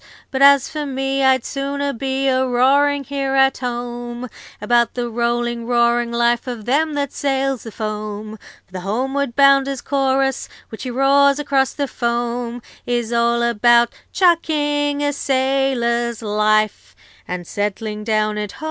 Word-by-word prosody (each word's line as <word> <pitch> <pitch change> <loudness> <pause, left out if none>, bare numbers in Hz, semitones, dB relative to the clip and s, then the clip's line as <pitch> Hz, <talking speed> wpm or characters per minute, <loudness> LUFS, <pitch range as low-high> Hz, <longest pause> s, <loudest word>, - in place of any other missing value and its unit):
'But 265 -1 -2
as 280 -1 +6
for 305 -1 -5
me, 270 0 -1
I'd 260 -2 +3
sooner 280 0 -3
be 270 +2 -2
A 260 0 +2
roaring 280 +3 +2
here 275 0 -2
at 270 0 +3
home 240 0 -5 0.3
About 235 +2 +1
the 240 -1 -3
rolling, 235 0 -1
roaring 235 0 +2
life 235 +1 +1
Of 235 -4 -6
them 300 +4 +1
that 280 -2 -2
sails 270 -3 -1
the 225 - -9
foam. 215 0 -5 0.3
'For - - -35
the 185 - -6
homeward 255 +7 -2
bounder's 275 -1 +4
chorus, 270 -1 0 0.2
Which 220 - -9
he 255 - -4
roars 275 +2 +3
across 280 -2 0
the 285 -1 -2
foam, 240 0 -3 0.2
Is 240 -1 -1
all 235 0 +2
about 235 +1 +3 0.2
chucking 295 -5 +1
a 290 0 0
sailor's 260 -4 0
life, 215 0 0 0.3
And 180 -1 -5
settling 210 +2 -4
down 215 -1 0
at 210 -1 -5
home. - - -14
245 Hz, 150 wpm, -19 LUFS, 235-275 Hz, 0.3 s, as